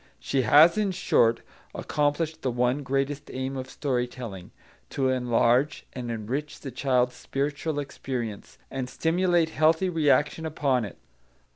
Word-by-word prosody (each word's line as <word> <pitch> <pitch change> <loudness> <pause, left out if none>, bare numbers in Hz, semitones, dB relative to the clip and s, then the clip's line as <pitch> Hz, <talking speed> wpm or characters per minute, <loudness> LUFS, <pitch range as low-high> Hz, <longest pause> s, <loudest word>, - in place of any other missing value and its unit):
She 135 - 0
has, 155 - +6
in 210 -2 +1
short, 115 -9 +2 0.3
accomplished 155 +2 -1
the 130 - 0
one 125 +3 +1
greatest 140 +1 -2
aim 130 +1 -3
of 130 -1 -5
story 125 -4 -1
telling, 110 -8 -8 0.4
to 135 -1 0
enlarge 125 +2 +2
and 125 -2 -5
enrich 120 +7 -4
the 135 - -6
child's 125 -1 +1
spiritual 145 +4 -3
experience, 125 -6 -5
and 130 -2 -4
stimulate 175 +1 +1
healthy 160 +4 +2
reaction 155 -1 +2
upon 135 -6 0
it. 100 - -10
135 Hz, 135 wpm, -26 LUFS, 125-150 Hz, 0.4 s, has